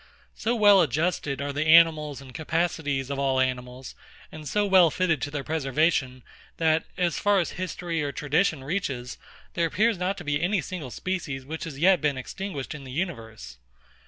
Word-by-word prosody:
So 230 +2 -1
well 205 -3 +6
adjusted 150 -2 -1
are 140 0 -3
the 155 +3 +6
organs 155 -4 +2
and 130 -2 -13
capacities 155 -4 -1
of 140 - -3
all 135 -1 +1
animals, 125 0 -3 0.4
and 155 -3 -8
so 210 +5 +1
well 190 -4 +6
fitted 170 -4 0
to - - -2
their 145 -1 -4
preservation, 135 -3 0 0.3
that, 160 -1 +2
as 175 -3 0
far 205 -1 +3
as 175 - -1
history 175 -2 -4
or 145 -1 -2
tradition 150 +1 0
reaches, 135 -6 -3 0.3
there 170 -1 +1
appears 215 +3 +1
not 185 +2 -1
to - - -8
be 145 0 -1
any 190 +3 +1
single 165 -4 -6
species 145 -4 -4
which 160 +3 -6
has 155 -4 -7
yet 180 +4 +4
been 145 -3 0
extinguished 145 +1 -6
in 150 -2 -9
the 130 - -9
universe. 115 - -5
155 Hz, 180 wpm, -26 LUFS, 135-180 Hz, 0.4 s, well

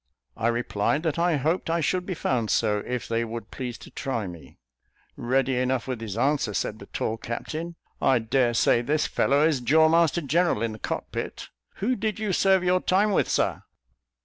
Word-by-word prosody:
I 115 - -1
replied, 120 +4 0
that 160 -1 -1
I 170 -1 +3
hoped 160 +6 0
I 165 +1 +1
should 180 +3 0
be 185 - -2
found 120 -8 -1
so, 105 -2 +2
if 125 -2 -3
they 115 0 0
would 115 -1 -7
please 125 -2 -5
to - - -13
try 130 -6 -3
me. 85 -3 -10 0.6
"Ready 130 +1 +1
enough 130 0 0
with 125 -3 -4
his 110 -2 -5
answer," 135 -4 +1
said 110 - -2
the 100 - -11
tall 110 - -2
captain; 155 +9 -5 0.3
"I 130 - +4
daresay 120 0 +2
this 150 +5 0
fellow 140 +3 +2
is 150 -5 +1
jaw 160 +6 +5
master 170 +1 +3
general 155 -5 +1
in 115 - -1
the 110 - -9
cockpit. - - -5 0.3
Who 250 +6 0
did 215 0 -2
you 215 -3 -1
serve 190 0 +3
your 180 0 +2
time 200 +3 +2
with, - - +1
Sir?" - - 0
135 Hz, 190 wpm, -26 LUFS, 115-170 Hz, 0.6 s, jaw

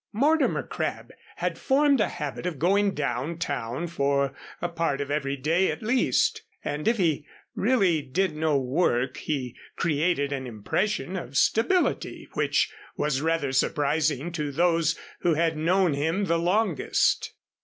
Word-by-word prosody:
Mortimer 295 +8 +2
Crabb - - -4 0.2
had - - -2
formed 280 -2 +3
a - - +1
habit 150 0 -4
of 170 -5 -3
going 195 +5 +2
down 150 +3 -2
town 140 -2 -3
for 140 -4 0 0.3
a 175 - -1
part 165 -4 -1
of 140 0 -3
every 140 -1 -1
day 165 +7 +2
at - - -4
least, 240 +4 +2 0.2
and 145 +1 -3
if 230 +1 +3
he 160 -6 0 0.3
really 195 -9 +2
did 160 +4 -1
no 155 -2 +1
work 130 -2 0
he 130 -5 -3 0.2
created 150 -2 +1
an 130 -2 -4
impression 180 - -2
of 140 -7 -4
stability 350 - +1
which - - +1 0.2
was 145 -2 0
rather 160 -3 0
surprising 150 +2 +1
to 150 -4 -3
those 165 +1 +2 0.2
who 170 -3 +2
had 165 0 +1
known 175 +2 +2
him 160 +8 0
longest. 175 0 +1
160 Hz, 145 wpm, -26 LUFS, 140-180 Hz, 0.3 s, formed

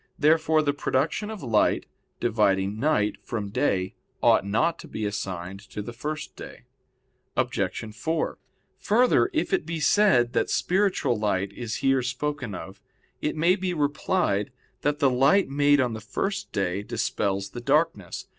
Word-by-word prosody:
Therefore 155 +1 +3
the 145 -1 +1
production 145 +9 -1
of 215 -7 -7
light, 115 -4 +2 0.3
dividing 105 -3 +1
night 110 -8 +1
from 105 -4 -4
day, 95 -6 0 0.3
ought - - +5
not 115 +12 +1
to - - -10
be 110 - -4
assigned 95 -2 -4
to 105 - -5
the 120 - -7
first 150 +5 -5
day. - - -10 0.7
Obj. 110 -1 -1
4: 160 0 -2 0.4
Further, 245 - +3
if 315 - -1
it 190 - +2
be 165 0 -4
said 150 - +4
that - - +1
spiritual 185 - +1
light 100 -2 0
is 115 -1 -4
here 135 -1 +4
spoken 125 -2 -3
of, 95 +2 -9 0.4
it 150 - -1
may 170 +4 +3
be 185 -2 -2
replied 145 - 0 0.3
that 145 0 +1
the 140 -2 +3
light 140 +10 +4
made 145 +1 +3
on 125 -3 +1
the 110 - -6
first 195 - -3
day 95 0 -1
dispels 100 -1 -2
the 120 - -7
darkness. 140 - 0
130 Hz, 155 wpm, -26 LUFS, 105-160 Hz, 0.7 s, ought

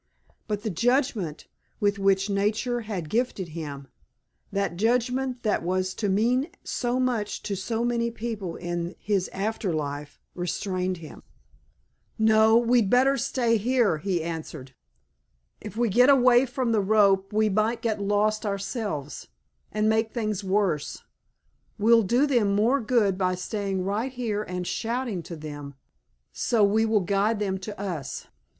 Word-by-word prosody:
But 210 -1 -3
the 220 - -2
judgment 230 - 0 0.3
with 205 -2 +1
which 195 0 +2
nature 215 +5 0
had 200 -7 -5
gifted 215 -3 -1
him, 145 -4 -7 0.6
that 195 -3 -1
judgment 250 +4 0
that 215 - +1
was 185 +2 -1
to 205 0 -2
mean 245 - +2
so 245 0 -1
much 240 -5 -1
to 200 - -2
so 225 +5 -2
many 235 -1 0
people 220 -6 -5
in 175 0 -4
his 200 -3 -1
after 205 0 -2
life, 145 -2 -4
restrained 185 +1 -2
him. 160 -2 -11 1.0
"No, 220 0 +5
we'd 235 -3 +3
better 265 +4 +4
stay 235 -4 +1
here," 230 -6 +2
he 175 -1 -1
answered. 155 -5 -6 0.9
"If 210 +1 -8
we 240 0 +2
get 245 +6 +5
away 255 -1 +5
from 250 -1 -1
the 220 -2 +3
rope 195 -1 +3
we 215 +1 +2
might 215 +3 0
get 220 -3 -1
lost 210 +1 +1
ourselves, 200 - -4 0.4
and 215 0 +1
make 220 0 +2
things 215 -4 -2
worse. 190 -6 -1 0.7
We'll 230 +2 +5
do 240 +7 +2
them 230 -8 +2
more 240 +7 +3
good 210 -5 +1
by 185 -1 +1
staying 195 0 -3
right 210 +7 -1
here 230 -5 -2
and 180 -3 -4
shouting 230 -2 -2
to 170 - -8
them 145 -2 -8 0.6
so 225 -3 +1
we 215 +3 +3
will 220 -2 +3
guide 200 +4 +1
them 195 -2 -2
to 205 +2 -8
us. 170 -9 -4
210 Hz, 145 wpm, -26 LUFS, 185-235 Hz, 1.0 s, No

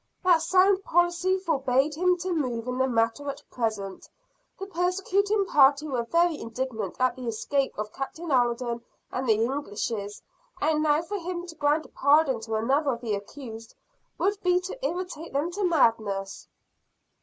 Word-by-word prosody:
"That 350 -3 +5
sound 380 +2 +4
policy 350 +2 +2
forbade 280 -5 +1
him 360 +3 +2
to 370 0 -1
move 250 -7 -2
in 250 +1 -2
the 260 - +3
matter 230 +4 0
at 280 +1 -6
present. 215 -5 -3 0.5
The 390 - -5
persecuting 390 +3 +1
party 285 -2 +4
were 255 -5 -1
very 335 +3 +2
indignant 235 0 -4
at 255 -1 +2
the 255 -2 -7
escape 265 +5 -1
of 210 0 -4
Captain 315 +4 -5
Alden 240 -2 +1 0.3
and 255 -1 -2
the - - +7
Englishes; 220 -3 -3 0.4
and 305 0 +1
now 305 +1 +2
for 405 +4 -4
him 350 0 -4
to 345 - -9
grant 300 0 +1
a - - -14
pardon 280 -3 +3
to 220 0 -4
another 270 +6 +1
of 235 - -7
the 225 -4 -2
accused, 225 +2 -8 0.4
would 405 +1 0
be 360 0 +3
to 385 +7 -7
irritate 355 - -4
them 290 +5 0
to 400 +3 -3
madness." 220 - +1
285 Hz, 165 wpm, -27 LUFS, 235-350 Hz, 0.5 s, the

